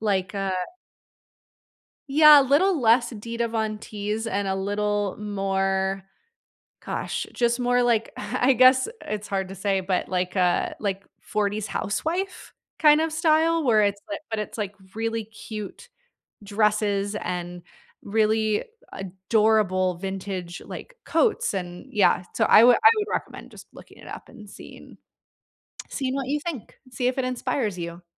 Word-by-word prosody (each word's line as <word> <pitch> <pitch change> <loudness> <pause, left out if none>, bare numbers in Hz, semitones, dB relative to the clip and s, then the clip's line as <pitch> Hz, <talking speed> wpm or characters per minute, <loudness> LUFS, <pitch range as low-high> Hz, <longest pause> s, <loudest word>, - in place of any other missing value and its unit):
like, 195 -3 -1
uh 195 -1 -2 1.6
Yeah, 300 0 +8
a - - +1
little 315 +6 +3
less 235 +1 +4
Dita 230 +2 -3
Von 220 -1 -2
Teese 210 +1 -4
and 200 0 -1
a 190 - 0
little 205 0 -1
more 195 -1 -1 0.8
gosh, - - -3
just 240 0 +1
more 245 0 +2
like, 235 -2 +1
I 250 +5 +1
guess 255 - +5 0.2
it's 210 0 -4
hard 190 -1 -1
to 195 - -8
say, 195 0 0
but 185 -1 -2
like 180 +1 -2
a 180 -1 +1
like, 195 -2 -3 0.2
'40s 210 0 -2
housewife 350 - -3 0.3
kind 300 -1 +6
of 320 0 -1
style 320 +1 +2
where 225 -5 +4
it's 200 -1 0
li 200 - -2
but 220 -1 -2
it's, 210 - -5
like, 205 -1 -4 0.2
really 225 0 -2
cute 220 - -9 0.6
dresses 205 -1 0
and 175 0 -4 0.4
really 215 0 +1 0.3
adorable 190 -1 +1
vintage, 190 -2 -5
like, - - -9
coats, 450 - +1
and 180 -2 -6
yeah 200 -3 +3
so, 220 - +1
I 215 - +7
would 245 0 +7
I 440 - +7
would 420 -1 -1
recommend - - -5
just - - -13
looking - - -15
it - - -14
up - - -9
and 215 -5 -13
seeing, - - -13 0.9
seeing 265 -1 -2
what 270 -2 -3
you 295 +2 0
think. 285 -10 -6 0.2
See 250 0 0
if 255 - -3
it 260 - 0
inspires 245 -4 -2
you. 170 0 -6
210 Hz, 150 wpm, -24 LUFS, 195-245 Hz, 1.6 s, Yeah